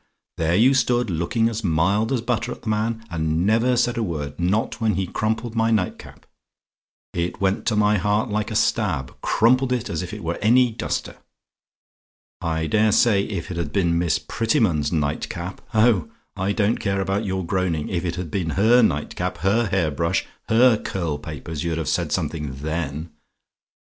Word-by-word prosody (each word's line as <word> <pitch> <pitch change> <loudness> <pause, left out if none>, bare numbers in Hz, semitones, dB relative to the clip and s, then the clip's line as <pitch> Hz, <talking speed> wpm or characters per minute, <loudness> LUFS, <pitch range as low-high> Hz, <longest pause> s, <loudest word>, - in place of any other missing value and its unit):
There 80 +1 +1
you 120 +7 +5
stood 120 -4 +1
looking 85 +8 +1
as 115 0 -3
mild 95 +6 +1
as 130 -4 +1
butter 120 0 -1
at - - -8
the 115 - -3
man, 110 +1 -1
and 80 +1 0
never 115 +4 +3
said 120 0 +1
a - - 0
word; 75 -6 -4
not 100 +7 0
when 110 -3 +2
he 95 0 0
crumpled 110 +5 -2
my 115 0 +2
night 105 -5 0
cap - - -14 0.9
it 85 0 -2
went 95 0 0
to 115 - +2
my 105 -1 +3
heart 105 +4 +1
like 105 +1 -1
a 110 - -4
stab 85 - 0
crumpled 125 +3 +3
it 125 -2 -1
as 80 - -2
if 90 - -6
it 105 -3 -7
were 85 +1 -3
any 120 +3 +4
duster. 110 - -4 1.2
I 80 -1 -1
dare 105 +7 +3
say 100 -2 +3
if 95 -5 -5
it 85 - -4
had 85 -4 -3
been 85 -3 +1
Miss 85 -2 +1
Prettyman's 95 -8 0
night 75 -2 -1
cap 85 +2 -6
oh, 110 -6 +3 0.3
I 95 +2 -1
don't 105 +2 +1
care 100 -1 -1
about 95 +2 -1
your 95 -2 -2
groaning 85 -4 -1
if 90 -2 -2
it 85 -2 -2
had 90 -3 -5
been 90 -5 -1
her 115 +5 +5
night 75 -10 0
cap, - - -3
her 105 +4 +2
hair 95 -5 +1
brush 85 +3 0 0.2
her 115 0 +5
curl 85 -6 -3
papers, 75 0 -6
you'd 85 -2 -1
have 80 -4 -3
said - - 0
something 75 -5 -2
then. 80 +2 -4
95 Hz, 190 wpm, -23 LUFS, 85-110 Hz, 1.2 s, you